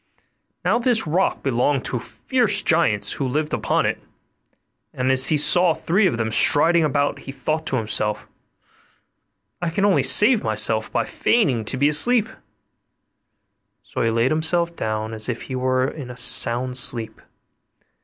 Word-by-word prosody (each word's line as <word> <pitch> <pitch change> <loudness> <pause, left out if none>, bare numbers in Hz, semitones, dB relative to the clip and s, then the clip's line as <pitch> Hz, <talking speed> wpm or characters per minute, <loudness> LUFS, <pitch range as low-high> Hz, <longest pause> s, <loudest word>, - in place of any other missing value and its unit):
Now - - +1
this 235 -4 0
rock 170 +5 -1
belonged 135 +1 -1
to 125 - -3
fierce 230 - -1
giants 105 -12 0
who 135 - -3
lived 150 +4 -3
upon - - -1
it; - - -3 0.9
and 130 +1 0
as 130 0 +5
he 155 - +1
saw 175 +3 +2
three 190 +4 +1
of 165 - -2
them 110 -1 -3
striding 165 +8 +3
about, 145 -1 -1
he 135 - -9
thought 155 +3 -4
to - - -2
himself, 105 -2 -2 1.4
'I 175 - -2
can 195 +4 -1
only 190 -9 +2
save 210 - +4
myself 110 0 0
by 115 - -1
feigning 140 - 0
to 130 - -2
be 140 +2 +2
asleep'; 220 +10 +3 1.5
so - - -6
he 115 - +1
laid 115 +3 0
himself 170 +2 -1
down 110 -2 -4
as 110 +2 -4
if 120 - -5
he 130 - -7
were 130 0 0
in 140 -3 -8
a 125 - -10
sound 125 +1 +3
sleep. 115 -3 0
135 Hz, 155 wpm, -21 LUFS, 120-170 Hz, 1.5 s, as